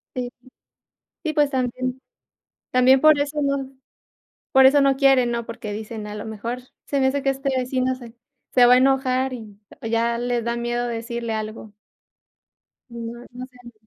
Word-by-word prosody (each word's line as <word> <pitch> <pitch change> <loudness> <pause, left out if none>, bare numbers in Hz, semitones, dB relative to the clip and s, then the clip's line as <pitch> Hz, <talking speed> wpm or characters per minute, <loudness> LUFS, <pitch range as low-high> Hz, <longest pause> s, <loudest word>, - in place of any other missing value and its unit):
Sí. 250 -1 -3 0.9
Sí, 315 - -1
pues, 295 -2 +3
también 255 -1 -2 0.7
también 255 +1 +5
por 310 -1 +6
eso 290 +1 -1
no 275 -1 -1 0.8
por 265 -1 +7
eso 285 +2 +6
no 275 -1 +3
quieren, 270 -3 +4
¿no?, 235 0 -2
porque 230 -3 -6
dicen: 215 0 -6
"A 210 - -7
lo 210 - -6
mejor, 230 +3 -5 0.3
se 280 - -1
me 265 - +4
hace 275 +1 -1
que 275 - +2
este 270 +1 -2
vecino 255 0 0
se 240 -3 -12 0.4
se 250 - +7
va 245 - +7
a - - +6
enojar", 265 0 +2
y 215 -5 -9 0.2
y 225 - -4
ya 235 +1 +1
le 245 0 -1
da 235 +1 -2
miedo 240 0 -2
decirle 235 0 -4
algo. 215 0 -6 1.2
No, 235 +1 -7
no 250 +1 -7
salen. 245 -2 -16
250 Hz, 175 wpm, -23 LUFS, 235-265 Hz, 1.2 s, por